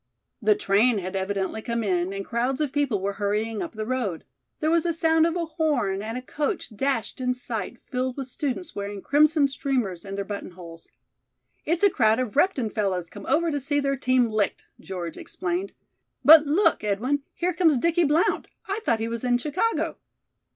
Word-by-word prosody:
The 210 0 +4
train 210 +3 +3
had 185 0 -4
evidently 195 +2 -2
come 235 0 -2
in, 180 -2 0
and 195 0 -5
crowds 250 +3 -1
of 300 -3 0
people 280 -8 +1
were 200 +1 -2
hurrying 210 +2 -1
up - - -5
the 215 -1 -4
road. 225 -9 -2 0.4
There 310 0 +1
was 335 -1 +3
a 340 -1 0
sound 320 0 +3
of 335 - -2
a 345 -1 -1
horn 285 - 0
and 225 +3 -4
a 255 - -6
coach 295 - -3
dashed 265 0 -1
in 250 0 0
sight 240 -2 -4
filled 255 0 -2
with 270 - -3
students 280 +6 -4
wearing 200 -1 -5
crimson 300 0 +4
streamers 250 -10 -2
in 195 -1 -6
their 200 0 -3
buttonholes. 175 -4 -8 0.8
"It's 335 +4 0
a 405 - +7
crowd 220 -5 +3
of 250 -3 -3
Repton 280 - +2
fellows 185 -5 -1
come - - -10
over 325 +4 +2
to 290 - -1
see 290 +2 0
their 275 -1 0
team 255 -2 +2
licked," 215 -3 -1
George 175 -3 -6
explained, 365 +2 -3 0.5
"but 310 -1 +9
look, 325 - +3
Edwin, 235 +8 0
here 360 +1 0
comes 320 -5 +3
Dickie 335 +5 +2
Blount. 300 +4 +2 0.2
I 395 +2 -2
thought 225 - +1
he 225 - -1
was 230 0 -4
in 245 -1 +3
Chicago." 330 - -1
250 Hz, 190 wpm, -25 LUFS, 205-300 Hz, 0.8 s, but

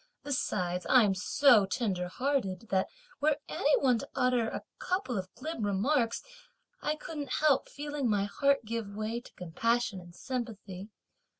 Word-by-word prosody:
Besides, 180 -10 -1
I'm 225 -7 +6
so 215 +2 +5
tender 190 -5 -1
hearted 230 -2 -1
that 190 -1 +2 0.3
were 295 0 +3
any 290 +2 +2
one 250 -3 +4
to - - -7
utter 250 -3 +2
a - - -5 0.2
couple 365 -9 -1
of 185 -2 -4
glib 315 -7 -4
remarks, 230 +5 +1 0.6
I 300 - 0
couldn't 300 -3 -5
help 300 -3 +3
feeling 290 -3 -3
my 205 -2 +2
heart 275 +5 +1
give 215 -2 -4
way 220 +3 -2
to - - -16
compassion 205 +4 -1
and 175 -1 -14
sympathy. 215 -6 -5
230 Hz, 145 wpm, -31 LUFS, 195-275 Hz, 0.6 s, I'm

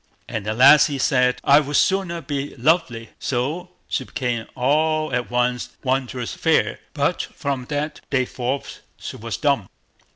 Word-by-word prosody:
And 105 -2 -4
the 110 - -1
lassie 140 +3 +6
said, 125 -2 +2
"I 140 +1 +6
would 145 -1 -3
sooner 185 -2 +1
be 145 -2 -4
lovely." 130 -5 +1
So 145 +8 -2 0.2
she - - -2
became 120 -5 -3
all 155 +3 +1
at 125 0 -1
once 125 0 -1
wondrous 130 -2 -1
fair; - - +1 0.2
but - - +1
from 135 -3 -3
that 150 +2 -3
day 130 -2 +1
forth 130 +2 -4 0.2
she - - -7
was 115 0 -4
dumb. 140 -10 +1
135 Hz, 150 wpm, -22 LUFS, 125-150 Hz, 0.2 s, lassie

